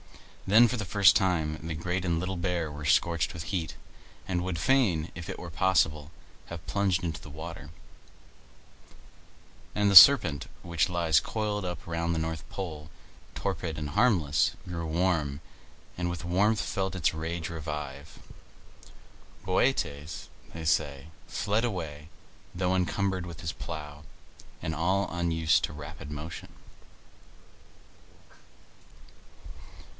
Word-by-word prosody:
Then, 115 +5 +7
for 115 - -2
the 110 - -3
first 100 +1 +5
time, 80 -5 +1
the 80 -1 -3
Great 90 +3 -2
and 85 -2 0
Little 95 +2 -3
Bear 85 -3 -1
were 75 +1 -8
scorched 85 +3 +2
with 80 - -6
heat, 85 -3 -3 0.5
and 90 -2 -1
would 90 -2 -3
fain, 100 - +2
if 85 +2 -7
it 95 - -5
were 85 -2 -7
possible, 80 -4 +1 0.4
have 85 -1 -8
plunged 95 -3 0
into 80 -2 -3
the - - -11
water; 80 0 -8 2.1
and 105 -1 +3
the 100 - +2
Serpent 85 - +9 0.2
which 85 +2 0
lies 85 -4 +3
coiled 105 -2 -2
up 90 -2 -5
round 85 0 -1
the 80 - -1
north 80 -1 -4
pole, 80 -5 -6 0.5
torpid 90 -5 -3
and 75 -1 -4
harmless, 90 - +3 0.2
grew 85 -2 -4
warm, 80 -4 0 0.6
and 90 0 -1
with 85 0 -5
warmth 105 +5 +2
felt 95 -1 -2
its 85 -4 +1
rage 80 +1 -4
revive. 75 -3 -6 1.3
Bootes, 80 - 0 0.3
they 80 -1 -6
say, 75 -2 0 0.2
fled 105 +3 0
away, 80 -9 -4 0.5
though 90 +1 +1
encumbered 95 0 0
with 85 -2 -9
his 80 -5 -4
plough, 75 +2 -7 0.6
and 80 - -2
all 95 +5 +1
unused 80 -2 +2
to - - -10
rapid 75 +1 -9
motion. 75 +3 -7
85 Hz, 130 wpm, -28 LUFS, 80-95 Hz, 2.1 s, Serpent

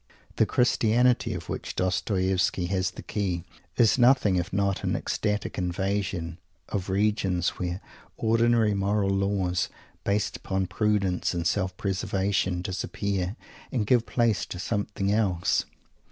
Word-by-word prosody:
The - - +4
"Christianity" 120 0 +3
of - - -7
which - - -5
Dostoievsky 95 0 +1
has 95 -1 +1
the - - -10
key 90 -5 -2 0.3
is 120 +2 +4
nothing 120 -6 +5
if 90 +1 -1
not 100 0 0
an - - 0
ecstatic 105 -1 -2
invasion 90 -2 -2 0.3
of 95 -2 -3
regions 95 -3 +1
where 90 +1 -3 0.4
ordinary 115 -1 +3
moral 100 0 +1
laws, 95 -2 0 0.3
based 100 +1 0
upon 95 -1 -1
prudence 95 -1 0
and 85 -1 -2
self 95 +1 0
preservation, 95 -1 0
disappear, 95 +1 -2 0.4
and 120 -6 0
give 120 +1 +3
place 115 -4 +1
to - - -6
something 100 0 -1
else. 95 -5 +1
100 Hz, 125 wpm, -27 LUFS, 95-105 Hz, 0.4 s, nothing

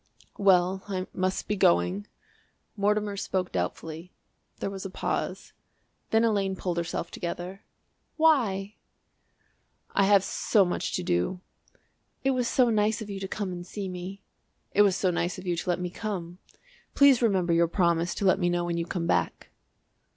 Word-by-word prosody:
"Well, 190 -1 +4
I 185 -2 -2
must 185 0 -1
be 210 - 0
going." 90 - +2 0.7
Mortimer 205 0 +1
spoke 185 -2 -2
doubtfully. 160 - -4 0.5
There 195 - -3
was 195 -1 -6
a 195 - -5
pause. - - -3 0.6
Then 225 +1 +3
Elaine 200 -4 +1
pulled 180 -2 -3
herself 170 0 -3
together. 180 +3 -5 0.6
"Why?" 220 -11 +2 1.1
"I 200 - +3
have 200 -1 +5
so 200 -1 +2
much 175 - -2
to - - -1
do." 90 - 0 0.8
"It 270 - +3
was 250 -2 0
so 245 -1 +3
nice 215 +1 +1
of 205 - -8
you 195 - -5
to 195 - -4
come 200 -1 -3
and 175 -1 -6
see 195 +2 -6
me." 185 +2 -7 0.5
"It 205 - +5
was 200 -3 +4
so 185 -2 +1
nice 175 +1 -1
of 185 - -9
you 175 -1 0
to 175 - -4
let 175 - +1
me 180 -1 -3
come. 185 -5 -5 0.6
Please 280 -3 +6
remember 190 -7 +2
your 170 0 +4
promise 170 -1 +1
to 200 - -2
let 190 0 +4
me 175 -2 +2
know 175 0 0
when 170 -1 -2
you 170 0 -2
come 170 -2 -2
back." - - -1
190 Hz, 170 wpm, -27 LUFS, 175-205 Hz, 1.1 s, Please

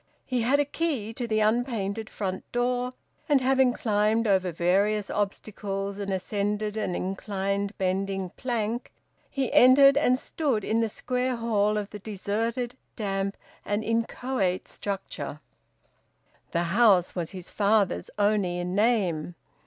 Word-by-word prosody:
He 250 -2 -1
had 260 +5 +3
a 290 - +3
key 280 -8 -2
to 240 +1 -4
the 215 -1 +1
unpainted 220 -2 0
front 190 -2 -4
door, 245 +1 0 0.4
and 285 -2 +5
having 260 0 +3
climbed 220 -1 +1
over 190 -3 +2
various 195 +5 +1
obstacles 200 -1 -3
and 200 -1 -3
ascended 205 +2 -1
an 200 -5 -2
inclined 195 +1 -2
bending 190 0 -1
plank, 235 -1 -3 0.4
he 270 -3 -2
entered 275 +2 +7
and 255 -4 +4
stood 265 -6 -1
in 220 +3 +1
the 225 - +1
square 250 +3 -1
hall 215 -3 +1
of 205 -1 -4
the 210 - -7
deserted, 225 +4 -2 0.2
damp, 195 -2 -2 0.3
and 205 +1 -1
inchoate 230 -3 -1
structure. 195 -6 -5 1.1
The 170 - 0
house 200 -6 +5
was 170 -3 -3
his 185 -2 -9
father's 200 - +2
only 205 -4 +2
in 175 +1 -3
name. 190 -7 +1
210 Hz, 135 wpm, -27 LUFS, 195-240 Hz, 1.1 s, entered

